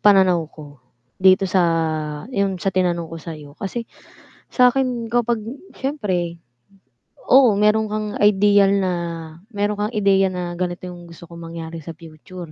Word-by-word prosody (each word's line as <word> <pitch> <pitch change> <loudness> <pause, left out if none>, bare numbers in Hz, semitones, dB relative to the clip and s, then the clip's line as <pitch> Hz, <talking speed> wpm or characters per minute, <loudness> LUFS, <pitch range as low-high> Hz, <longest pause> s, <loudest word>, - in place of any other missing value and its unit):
pananaw 185 -5 +4
ko 145 -4 -13 0.4
dito 190 0 +5
sa, 185 0 +2 0.7
yung 200 -3 0
sa 195 - +1
tinanong 175 -2 0
ko 165 - -6
sayo 150 -3 -9
kasi 230 +4 -4 0.7
sakin 250 -2 +2
kapag 235 -2 +1 0.3
siyempre 185 - -2 0.9
oo, 255 -4 +7
meron 210 +1 +3
kang 215 0 -3
ideal 205 -1 +4
na 185 -1 0 0.6
meron 205 0 0
kang 230 - -10
ideya 195 -2 +3
na 175 -1 -4
ganito 180 0 -3
yung 175 -1 -11
gusto 170 0 -13
kong 170 0 -11
mangyari 165 0 -6
sa 165 +1 -8
future 165 +1 -11
190 Hz, 140 wpm, -21 LUFS, 170-210 Hz, 0.9 s, oo